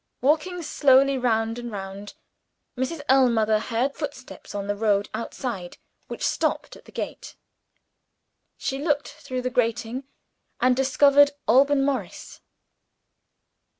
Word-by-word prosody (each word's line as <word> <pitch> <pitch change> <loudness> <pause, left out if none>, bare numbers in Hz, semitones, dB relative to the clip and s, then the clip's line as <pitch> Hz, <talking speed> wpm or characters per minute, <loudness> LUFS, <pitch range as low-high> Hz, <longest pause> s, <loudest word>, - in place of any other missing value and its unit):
Walking 320 +6 +1
slowly 275 -2 +4
round 225 -1 0
and 240 -1 -6
round, 200 0 -7 0.6
Mrs. 265 +5 -3
Ellmother 235 -5 +4
heard 240 +5 -1
footsteps 280 -8 -8
on 200 -1 -3
the 205 0 -2
road 205 -1 +1
outside, 220 -4 -5 0.3
which - - -4
stopped - - -1
at - - -17
the - - -15
gate. - - -6 1.2
She 270 - -3
looked 290 -1 0
through 255 -4 -6
the 255 - -2
grating, 235 +2 -1 0.5
and 250 0 +3
discovered 280 +2 +5
Alban 275 +3 +4
Morris. 255 -10 -4
255 Hz, 115 wpm, -24 LUFS, 225-280 Hz, 1.2 s, discovered